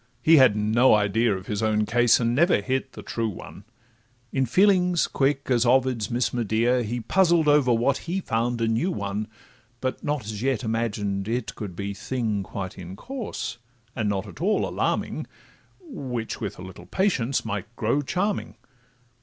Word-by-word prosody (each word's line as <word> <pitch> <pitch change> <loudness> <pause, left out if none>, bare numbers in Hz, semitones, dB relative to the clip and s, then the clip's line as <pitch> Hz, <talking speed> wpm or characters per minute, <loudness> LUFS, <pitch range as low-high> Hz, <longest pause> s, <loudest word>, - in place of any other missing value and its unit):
he 160 0 +7
had 130 -6 +6
no 110 +4 +4
idea 105 +2 +2
Of 95 - -10
his 105 0 -3
own 110 -1 +1
case, 120 +2 +4
and 115 -1 +1
never 170 - +4
hit 130 +5 -2
the - - -9
true 115 -1 -2
one; 95 0 -10 0.7
In 130 -2 +1
feelings 180 - +3
quick 135 0 0
as 120 -2 +3
Ovid's 125 -3 +2
Miss 120 +1 0
Medea, 120 +2 +1
He 120 +2 -3
puzzled 170 +2 +3
over 145 -4 +4
what 120 +4 +2
he 180 +3 -3
found 120 -6 -1
a 115 - +2
new 115 +11 +1
one, 100 - -3 0.5
But 130 +1 -3
not 145 -3 -1
as 105 -1 -5
yet 130 -3 0
imagined 105 -3 -2
it 120 +1 -2
could 100 -5 -7
be 100 +2 -4
Thing 110 -1 -2
quite 95 -1 -6
in 90 +1 -8
course, 235 - -6 0.4
and 110 -4 -1
not 100 0 -1
at 100 - -11
all 205 +4 +1
alarming, - - -2 0.5
Which, 130 - -5
with 105 -4 -4
a 90 - -9
little 95 0 -11
patience, 140 - 0
might 105 -2 -3
grow 120 +6 +1
charming. 195 +8 -2
120 Hz, 170 wpm, -25 LUFS, 105-135 Hz, 0.7 s, he